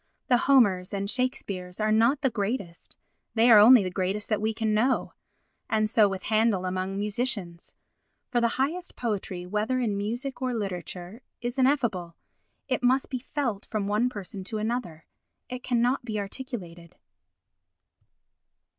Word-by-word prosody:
The 245 - +6
Homers 200 -8 +4
and 200 0 -2
Shakespeares 200 -7 -2
are 215 0 +1
not 230 +6 +3
the 265 -3 +1
greatest—they 220 +2 -2
are 215 - +10
only 230 +1 +8
the 185 - -3
greatest 190 +3 -2
that 215 -2 0
we 220 +1 +1
can 220 -1 -1
know. 240 +5 +1 0.6
And 215 -1 +2
so 215 -1 +4
with 195 -1 -5
Handel 215 -3 +2
among 185 +1 -2
musicians. 205 -5 -3 0.6
For 240 - +2
the 235 - +4
highest 325 +7 -2
poetry, 195 -6 -3
whether 210 +7 -1
in 225 -5 0
music 240 +7 -3
or 255 -2 -1
literature, 185 0 -5 0.2
is 245 +2 -4
ineffable—it 245 -1 -2
must 260 +2 +2
be 255 - -2
felt 245 -5 -3
from 215 -3 -2
one 210 +5 +1
person 200 -4 -7
to 220 +2 -3
another, 215 -8 -3 0.4
it 250 0 -5
cannot 245 +1 +1
be 220 -3 -3
articulated. 195 - -7
215 Hz, 145 wpm, -27 LUFS, 195-245 Hz, 0.6 s, are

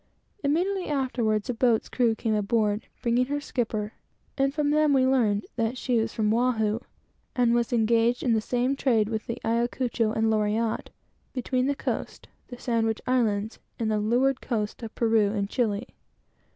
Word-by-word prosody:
Immediately 360 +6 0
afterwards, 245 -7 0
a 250 - -1
boat's 230 -1 +2
crew 235 -3 +1
came 220 0 -1
aboard, 210 0 0 0.2
bringing 245 +1 +2
her 290 +1 -1
skipper, 220 -5 -3 0.4
and 275 0 +1
from 295 0 0
them 305 -1 +3
we 260 -1 +4
learned 225 -6 +2
that 230 +2 0
she 245 -1 +1
was 225 0 -1
from 215 -1 +1
Oahu, 225 -3 +1 0.6
and 240 -2 +3
was 235 -1 +1
engaged 230 +1 +2
in 240 - +2
the 220 - +2
same 250 +4 0
trade 225 -6 +2
with 220 -1 -3
the 235 - -3
Ayacucho, 235 0 0
Loriotte, 220 0 0
etc., - - -33 0.4
between 255 0 0
the 285 - +1
coast, - - -4 0.2
the 245 - -9
Sandwich 225 -3 0
Islands, 220 -4 0 0.2
and 220 -2 -1
the 215 - +1
leeward 250 +5 +1
coast 215 -3 -3
of 225 -1 -8
Peru 220 -3 +2
and 200 -2 -1
Chili. 215 -5 0
230 Hz, 165 wpm, -26 LUFS, 220-255 Hz, 0.6 s, we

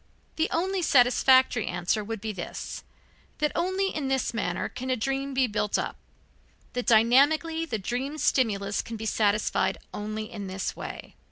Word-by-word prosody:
The 320 - +1
only 375 +3 0
satisfactory 260 - +4
answer 175 +4 -1
would 220 0 -5
be 220 0 -3
this, 185 -4 -6 0.5
that 300 0 +1
only 375 +3 0
in 295 -3 -2
this 265 -2 0
manner 230 - -1
can 255 +1 -6
a 255 - +2
dream 270 +3 -2
be 260 0 +4
built 210 -2 0
up, - - -3 0.8
that 245 0 -3
dynamically 285 +8 +4
the 225 - -2
dream 250 +8 -3
stimulus 205 -9 +1
can 230 - -7
be 220 - -6
satisfied 210 -1 +1 0.2
only 215 +2 -5
in 205 -4 -6
this 190 +1 -3
way. - - -8
245 Hz, 160 wpm, -27 LUFS, 215-280 Hz, 0.8 s, satisfactory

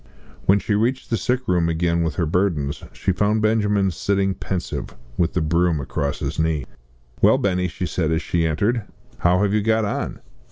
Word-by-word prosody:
When 95 - +6
she 105 - -1
reached 120 +6 0
the - - +3
sick 125 +2 -1
room 85 -3 +2
again 85 +1 +1
with 80 -4 -1
her 85 - +1
burdens, 80 -4 0
she 95 - -1
found 105 +3 +1
Benjamin 105 -3 +2
sitting 95 +2 0
pensive, 90 -8 -4 0.2
with 85 +3 +1
the 90 - +1
broom 85 0 +2
across 70 +1 -2
his - - -4
knees. 80 -4 0 0.6
"Well, - - +6
Benny!" 90 -2 0
she 90 +1 -4
said 80 -3 -1
as 80 +1 0
she 85 -1 +1
entered, 105 +10 +1 0.4
"how 90 +3 +3
have 100 0 +1
you 105 - +2
got 110 +1 +2
on?" 100 - -3
90 Hz, 190 wpm, -22 LUFS, 80-105 Hz, 0.6 s, When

